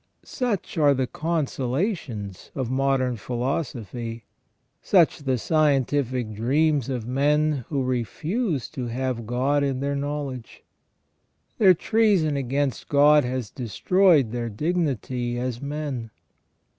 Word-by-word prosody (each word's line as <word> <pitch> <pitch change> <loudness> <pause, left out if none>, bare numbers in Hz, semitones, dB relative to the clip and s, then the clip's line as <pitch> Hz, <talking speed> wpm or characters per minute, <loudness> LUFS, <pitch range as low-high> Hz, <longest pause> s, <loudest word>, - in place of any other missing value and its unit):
Such 220 -9 -2
are 145 -2 +5
the 130 0 0
consolations 135 - -3
of 130 -2 -2
modern 130 -2 +1
philosophy; 120 -2 -4 0.6
such 175 -5 +3
the 135 -3 0
scientific 135 -5 +1
dreams 140 +5 +1
of 125 -4 -3
"men 145 +1 +1
who 140 -4 0
refuse 145 - -2
to 130 -5 -5
have 120 -1 -3
God 135 +4 +1
in 135 -2 -1
their 140 +1 -1
know 145 +1 -2
ledge. 130 -4 -8 1.0
Their 190 -4 +7
treason 195 -6 +2
against 135 0 -2
God 150 +1 +6
has 125 -3 -3
destroyed 145 - +2
their 120 -1 -3
dignity 130 - -1
as 125 -1 -3
men. 140 -5 -4
135 Hz, 115 wpm, -24 LUFS, 125-150 Hz, 1.0 s, Their